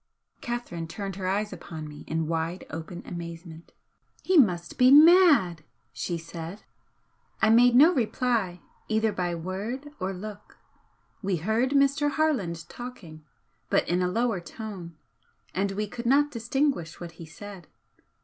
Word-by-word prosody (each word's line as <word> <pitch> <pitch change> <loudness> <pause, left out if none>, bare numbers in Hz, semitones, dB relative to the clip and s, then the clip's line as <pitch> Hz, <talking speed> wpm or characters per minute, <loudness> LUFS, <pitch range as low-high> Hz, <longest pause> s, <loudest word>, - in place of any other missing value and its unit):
Catherine 240 -9 -4
turned 195 +2 -6
her 185 -2 -3
eyes 205 +2 -1
upon 160 -3 -8
me 150 -1 -11
in 160 0 -1
wide 165 +2 -2
open 165 +2 -7
amazement. 170 -1 -8 0.5
"He 375 - +1
must 180 - +3
be 250 0 +7
mad!" 295 - +7 0.3
she 175 - -3
said. 165 +3 -8 0.8
I 220 - +4
made 240 +1 +6
no 310 +8 +7
reply 225 - 0 0.3
either 220 0 +1
by 175 -3 -2
word 200 - -5
or 185 0 -2
look. 205 +2 -9 0.6
We 195 -2 0
heard 220 +9 +1
Mr. 280 +1 +3
Harland 220 - -1
talking, 190 -11 -10 0.5
but - - +2
in 175 +1 +1
a 180 - +2
lower 225 0 0
tone, 175 -3 -8 0.6
and 195 +1 -1
we 210 +2 -1
could 235 +3 -6
not 290 +3 +4
distinguish 235 - -1
what 175 -1 -7
he - - -7
said. 190 +1 -11
195 Hz, 140 wpm, -27 LUFS, 170-245 Hz, 0.8 s, be